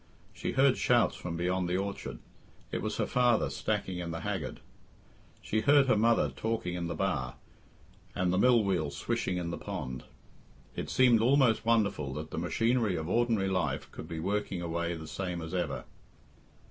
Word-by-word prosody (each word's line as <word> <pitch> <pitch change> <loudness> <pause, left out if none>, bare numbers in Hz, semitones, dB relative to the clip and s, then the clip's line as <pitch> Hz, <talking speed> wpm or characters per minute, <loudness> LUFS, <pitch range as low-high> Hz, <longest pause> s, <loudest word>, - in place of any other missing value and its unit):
She - - -3
heard 135 0 +4
shouts 120 -1 +3
from 85 -2 -5
beyond 90 +1 0
the 90 - +1
orchard 100 +1 -4 0.5
it - - -2
was - - -3
her - - +1
father 120 -2 +2
stacking 90 -2 -2
in 85 -1 -4
the 80 0 -4
haggard; - - -3 0.8
she 110 - 0
heard 140 +2 +5
her 130 - +3
mother 115 +2 +3
talking 110 -5 -3
in 85 -1 -3
the 85 - -3
bar, 70 -9 -1 0.8
and 90 -1 +1
the 90 - +2
mill 120 -1 +5
wheel 90 -7 0
swishing 75 +5 -2
in 85 -1 -3
the 85 - -5
pond. 65 -1 -5 0.7
It - - -4
seemed 125 -3 +5
almost 125 -3 +3
wonderful 100 -12 +1
that 75 +1 -6
the - - -3
machinery 115 +3 +1
of 80 -1 -3
ordinary 110 -1 +1
life 95 -1 -1
could - - -8
be 80 -1 -5
working 100 +1 -1
away 85 0 -2
the 80 -1 -8
same 90 +1 -4
as 80 +1 -6
ever. 90 -5 -2
95 Hz, 175 wpm, -30 LUFS, 85-115 Hz, 0.8 s, heard